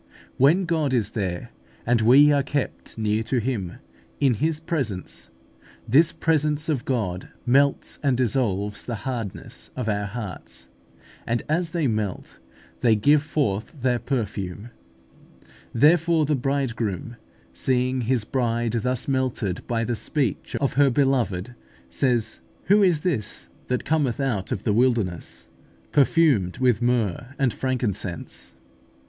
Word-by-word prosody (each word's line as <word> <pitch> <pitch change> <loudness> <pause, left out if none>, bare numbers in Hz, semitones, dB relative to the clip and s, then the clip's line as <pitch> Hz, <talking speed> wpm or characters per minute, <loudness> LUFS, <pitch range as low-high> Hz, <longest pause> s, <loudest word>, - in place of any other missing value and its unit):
When 160 +9 +4
God 155 -5 0
is 110 -4 0
there, 95 -5 -3 0.3
and 120 -1 +2
we 135 +6 +7
are 145 -1 +3
kept 140 -3 -4
near 110 0 0
to 125 +3 -1
Him, 110 -7 -2 0.5
in 135 -3 +4
His 155 +7 0
presence, 115 - -4 0.6
this 155 +8 +5
presence 150 -1 0
of 140 -6 -1
God 105 -9 -2 0.2
melts 140 +3 +2
and 135 -4 +2
dissolves 105 -5 0
the 120 - -4
hardness 115 -7 -5
of 125 -3 -3
our 105 -1 -1
hearts, 105 -3 -8 0.6
and 120 0 0
as 165 +2 0
they 165 -3 -1
melt, 110 -6 -3 0.4
they 115 -3 +4
give 145 +8 +4
forth 140 - -2
their 125 -1 +1
perfume. 105 -4 -4 1.0
Therefore 160 +4 +4
the 150 - +1
Bridegroom, 120 - -2 0.4
seeing 130 - 0
His 120 -1 +1
Bride 115 -1 -1
thus 125 +1 -2
melted 130 -9 -1
by 115 -1 0
the 120 +1 -1
speech 135 +3 -2
of 140 - 0
her 140 0 +4
Beloved, 125 -6 0 0.4
says, 120 -4 0 0.2
"Who 205 +3 +4
is 175 -6 +3
this 145 - -3 0.2
that 125 -1 -1
cometh 145 -7 +1
out 120 -9 -1
of 100 - -2
the 105 - +1
wilderness, 115 -7 0 0.4
perfumed 135 - +3
with 125 -3 +2
myrrh 120 +1 0
and 130 -4 +1
frankincense?" 100 - -3
(Cant. 65 - -31
125 Hz, 135 wpm, -24 LUFS, 110-140 Hz, 1.0 s, we